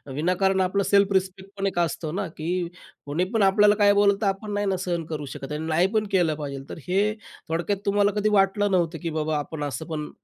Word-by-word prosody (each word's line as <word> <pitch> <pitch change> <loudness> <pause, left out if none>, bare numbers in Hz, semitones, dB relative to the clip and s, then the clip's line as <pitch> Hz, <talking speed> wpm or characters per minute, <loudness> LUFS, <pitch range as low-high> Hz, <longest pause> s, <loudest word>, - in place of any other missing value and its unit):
विनाकारण 185 +4 +1
आपलं 195 +2 +1
self 200 0 +3
respect 190 +1 -1
पण 195 0 0
एक 175 - -2
असतं 165 -1 -2
ना, 200 -2 -2
की 160 +1 -6 0.6
कोणी 150 +5 -1
पण 220 -3 +3
आपल्याला 205 +2 +5
काही 205 -1 +5
बोललं, 200 0 +4
तर 205 - +1
आपण 195 +2 -2
नाही 205 0 0
ना 190 -1 +1
सहन 170 -3 -2
करू 150 -2 -5
शकत 135 +2 -7
आणि 155 +2 -3
नाही 170 +4 +3
पण 215 -1 +2
केलं 170 -5 +2
पाहिजेल. 140 -2 -7
तर - - -7
हे 200 +4 +2 0.4
थोडक्यात 175 +5 -1
तुम्हाला 205 0 +3
कधी 215 +1 +2
वाटलं 195 +1 +2
नव्हतं, 170 -3 +1
की 165 - -1
बाबा, 155 -1 -1
आपण 150 +1 -5
असं 145 +2 -4
पण 150 -2 -4
185 Hz, 225 wpm, -25 LUFS, 160-200 Hz, 0.6 s, आपल्याला